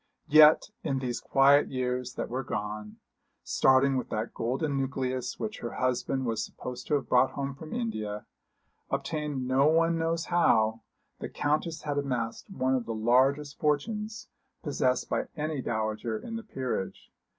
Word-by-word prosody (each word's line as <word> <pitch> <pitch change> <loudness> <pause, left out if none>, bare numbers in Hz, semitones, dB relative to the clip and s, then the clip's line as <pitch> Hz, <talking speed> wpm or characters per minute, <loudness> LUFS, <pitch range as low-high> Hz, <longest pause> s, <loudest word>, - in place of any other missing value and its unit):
Yet 155 +6 +7
in 140 -4 0
these 125 -2 -2
quiet 140 +1 +5
years 125 -1 -2
that - - -3
were 130 +2 -3
gone 105 -1 -5 0.5
starting 135 +1 +4
with 125 - -3
that 110 +2 -3
golden 135 +5 -1
nucleus 130 -2 -2
which 215 0 -4
her 120 - -5
husband 130 +1 -1
was 115 -2 -1
supposed 125 0 -7
to 150 - +2
have 140 - -2
brought 130 +1 +3
home 140 0 -3
from 155 +3 -10
India, 110 - -3 0.6
obtained 150 -5 -2
no 135 +2 +4
one 165 +1 +3
knows 165 0 0
how, 115 -10 +3 0.4
the - - -5
Countess 155 +2 -1
had 145 -1 -1
amassed 125 - -3
one 130 -8 0
of 125 -3 -1
the 115 - -3
largest 135 +6 +2
fortunes 210 +9 -1 0.4
possessed 130 -4 0
by - - -1
any 155 -2 -2
dowager 110 -1 -2
in 230 - -7
the 230 - -4
peerage. 125 - -4
135 Hz, 155 wpm, -29 LUFS, 125-150 Hz, 0.6 s, Yet